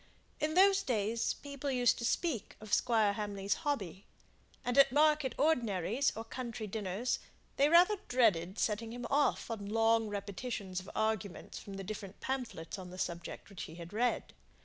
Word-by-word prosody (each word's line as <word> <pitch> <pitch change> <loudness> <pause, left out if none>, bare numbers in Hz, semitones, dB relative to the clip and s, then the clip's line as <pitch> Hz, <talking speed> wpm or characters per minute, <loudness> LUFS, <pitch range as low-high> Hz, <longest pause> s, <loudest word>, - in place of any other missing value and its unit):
In 310 +1 0
those 390 +1 +6
days 225 - 0
people 280 -1 -5
used 250 -2 +3
to 235 - -2
speak 275 - -1
of 215 -1 -8
Squire 220 -4 +3
Hamley's 205 -1 -1
hobby; 200 - -3 0.6
and 245 0 0
at 275 - +7
market 300 -2 +3
ordinaries, 240 - +2
or 225 - -4
county 235 -2 -5
dinners, 210 +3 -2 0.4
they 280 +2 +5
rather 355 +6 +6
dreaded 200 -7 +2
setting 225 +1 -1
him 245 0 -5
off 285 -4 +2
on 205 -3 -4
long 225 0 +3
repetitions 200 -1 -4
of 185 - -10
arguments 220 -5 -2
from 200 - -9
the 195 - -5
different 200 -1 -7
pamphlets 240 -10 -4
on 185 -1 -8
the 180 - -9
subject 170 -2 -4
which 195 -5 -7
he 160 - -10
had 170 +2 -9
read. 240 +3 0
225 Hz, 165 wpm, -33 LUFS, 200-255 Hz, 0.6 s, at